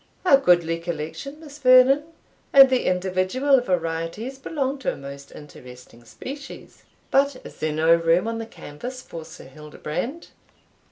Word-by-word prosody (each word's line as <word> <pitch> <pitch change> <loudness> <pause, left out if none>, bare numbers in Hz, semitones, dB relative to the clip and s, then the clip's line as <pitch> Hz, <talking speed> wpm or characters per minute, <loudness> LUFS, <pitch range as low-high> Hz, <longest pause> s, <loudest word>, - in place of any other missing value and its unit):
"A 320 - +7
goodly 175 -7 +2
collection, 170 - -6
Miss 300 -2 -12
Vernon, 260 +2 +6 0.5
and 270 -1 +9
the 255 - +1
individual 185 +10 +1
varieties 180 +6 -3
belong 275 -1 -3
to - - -1
a - - -7
most 140 0 -10
interesting 125 -4 -14
species. 270 - -10 0.3
But 280 0 +3
is - - -11
there 155 - -1
no 160 +2 +3
room 170 +4 +2
on 230 0 -3
the 225 - -6
canvas 250 - -9
for 165 -1 -9
Sir - - -13
Hildebrand?" 150 - -6
185 Hz, 145 wpm, -23 LUFS, 160-270 Hz, 0.5 s, and